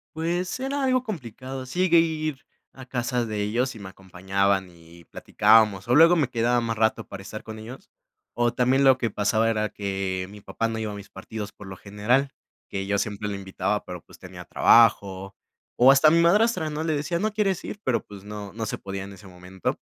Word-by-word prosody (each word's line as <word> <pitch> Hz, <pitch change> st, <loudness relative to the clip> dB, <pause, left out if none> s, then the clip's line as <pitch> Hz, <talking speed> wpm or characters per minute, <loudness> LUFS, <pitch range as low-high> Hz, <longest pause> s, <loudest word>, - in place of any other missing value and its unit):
Pues, 175 Hz, +8 st, -2 dB
era 275 Hz, +1 st, -2 dB
algo 255 Hz, -1 st, +2 dB
complicado. 130 Hz, -, -7 dB
Sí 130 Hz, +8 st, -6 dB
llegué 170 Hz, -2 st, +4 dB
a -, -, +8 dB
ir, 155 Hz, -4 st, -2 dB, 0.3 s
a 130 Hz, -, -12 dB
casa 125 Hz, -1 st, -2 dB
de 105 Hz, -2 st, -3 dB
ellos 120 Hz, +5 st, -1 dB
y -, -, -10 dB
me 100 Hz, -2 st, -8 dB
acompañaban, 95 Hz, +1 st, -1 dB
y 85 Hz, 0 st, -17 dB
platicábamos. 105 Hz, +3 st, +2 dB
O 125 Hz, -, +4 dB
luego, 165 Hz, +3 st, +7 dB
me 150 Hz, -7 st, +1 dB
quedaba 120 Hz, 0 st, +1 dB
más 115 Hz, -1 st, -3 dB
rato, 110 Hz, -1 st, +1 dB
para 100 Hz, -, -9 dB
estar 110 Hz, +2 st, -8 dB
con 110 Hz, 0 st, -9 dB
ellos. 125 Hz, -, -11 dB, 0.4 s
O 120 Hz, -1 st, +1 dB
también 130 Hz, +2 st, +2 dB
lo 130 Hz, -1 st, +6 dB
que 120 Hz, -3 st, -1 dB
pasaba, 110 Hz, +2 st, +1 dB
era 110 Hz, -1 st, 0 dB
que 95 Hz, -2 st, -3 dB
mi 105 Hz, -, -11 dB
papá 115 Hz, +3 st, -3 dB
no 110 Hz, 0 st, -4 dB
iba 110 Hz, -1 st, -3 dB
a -, -, -7 dB
mis 100 Hz, -1 st, -10 dB
partidos 105 Hz, +2 st, -7 dB
por 105 Hz, 0 st, -13 dB
lo 95 Hz, -, -8 dB
general. 105 Hz, +8 st, 0 dB, 0.4 s
Que 95 Hz, 0 st, -4 dB
yo 100 Hz, -, +1 dB
siempre 105 Hz, 0 st, -3 dB
lo 100 Hz, -, -3 dB
invitaba, 95 Hz, -1 st, -2 dB
pero, -, -, -8 dB
pues, -, -, -17 dB
tenía 90 Hz, -1 st, -11 dB
trabajo. 100 Hz, -2 st, +3 dB, 0.4 s
O 130 Hz, +2 st, +7 dB
hasta 140 Hz, +3 st, +5 dB
a 155 Hz, -, +6 dB
mi 170 Hz, -, +4 dB
madrastra, 185 Hz, -1 st, +3 dB
¿no? 155 Hz, +1 st, -4 dB
Le 160 Hz, -2 st, 0 dB
decía: 170 Hz, +4 st, -2 dB
"¿no 215 Hz, +2 st, -1 dB
quieres 200 Hz, -4 st, 0 dB
ir?". 205 Hz, -, -7 dB
Pero, 125 Hz, -3 st, +1 dB
pues 100 Hz, -2 st, -12 dB
no, 105 Hz, -1 st, -8 dB
no 110 Hz, +1 st, -4 dB
se 110 Hz, -, -4 dB
podía 95 Hz, 0 st, -6 dB
en 100 Hz, -, -9 dB
ese 100 Hz, +1 st, -13 dB
momento. 90 Hz, 0 st, -5 dB
115 Hz, 220 wpm, -25 LUFS, 100-140 Hz, 0.4 s, a